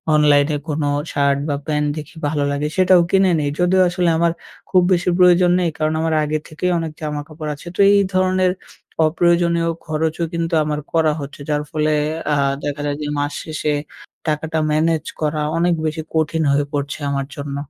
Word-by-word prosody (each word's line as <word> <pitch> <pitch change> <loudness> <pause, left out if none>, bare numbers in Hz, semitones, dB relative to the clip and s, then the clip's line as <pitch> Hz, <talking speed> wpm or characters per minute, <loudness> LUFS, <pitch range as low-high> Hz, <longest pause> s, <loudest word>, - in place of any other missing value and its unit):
অনলাইনে 150 0 +4
কোনো 150 0 -1 0.3
শার্ট 140 -2 +2
বা, 145 - 0
প্যান্ট 150 -1 0
দেখি 155 +1 -8
ভালো 145 -1 -1
লাগে, 145 +1 -1
সেটাও 185 -1 +5
কিনে 190 -1 +4
নেই। 145 -1 0
যদিও 180 +1 +3
আসলে 175 0 +1
আমার 170 0 +2 0.4
খুব 185 - +4
বেশি 180 0 +1
প্রয়োজন 180 -1 +5
নেই। 175 -2 +1
কারণ 155 0 0
আমার 160 0 0
আগে 150 +1 -1
থেকেই 180 +4 -2
অনেক 165 -1 -4
জামাকাপড় 150 +1 -5
আছে। 145 - -14
তো - - -12
এই 200 - +5
ধরনের 185 0 +2 0.6
অপ্রয়োজনীয় 170 +1 +2 0.2
খরচও 160 +1 -1
কিন্তু 170 0 -2
আমার 150 0 -2
করা 160 -2 +3
হচ্ছে, 140 +1 -8
যার 150 -1 +1
ফলে 155 0 0 0.4
আ - - +3 0.3
দেখা 145 0 -3
যায় 145 0 -2
যে 150 - -3
মাস 145 0 -2
শেষে 155 -1 -2 0.6
টাকাটা 155 +1 -1
ম্যানেজ 160 +1 +1 0.2
করা 155 0 0 0.2
অনেক 175 +1 +2
বেশি 155 +1 -2
কঠিন 160 0 +1
হয়ে 145 +1 +2
পড়ছে 140 0 -3
আমার 140 -1 -1
জন্য। 140 -1 -5
155 Hz, 175 wpm, -19 LUFS, 150-170 Hz, 0.6 s, সেটাও